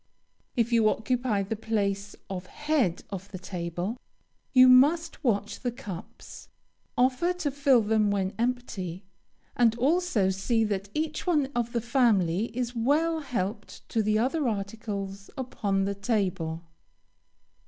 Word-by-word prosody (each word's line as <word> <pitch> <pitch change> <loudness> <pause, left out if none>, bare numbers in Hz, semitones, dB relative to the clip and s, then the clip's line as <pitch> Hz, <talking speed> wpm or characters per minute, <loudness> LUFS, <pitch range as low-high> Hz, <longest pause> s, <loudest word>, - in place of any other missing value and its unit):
If 235 -1 +1
you 225 -2 +5
occupy 235 -2 0
the 205 +3 -3
place 205 -2 -2
of 185 -1 -6
head 295 - 0
of 195 0 -6
the 190 - -7
table, 180 +3 -4 0.5
you 255 0 +8
must 285 +7 +4
watch 210 -4 0
the 245 - -2
cups, 210 -8 -9 0.5
offer 260 +8 +2
to 350 -5 -2
fill 275 -3 +4
them 215 0 +2
when 195 -1 0
empty, 210 -7 -3 0.5
and 230 -2 +4
also 265 - +2
see 225 +4 +1
that 200 -2 -2
each 310 +2 -2
one 295 -6 +2
of 240 -1 -1
the 235 - -1
family 220 -7 +2
is 245 -1 -2
well 305 +8 +2
helped 210 -7 -4
to 225 - +1
the 215 0 +2
other 265 +5 +1
articles 200 -2 -4
upon 200 -7 -1
the 200 - -1
table. 190 -6 -1
225 Hz, 135 wpm, -27 LUFS, 195-255 Hz, 0.5 s, you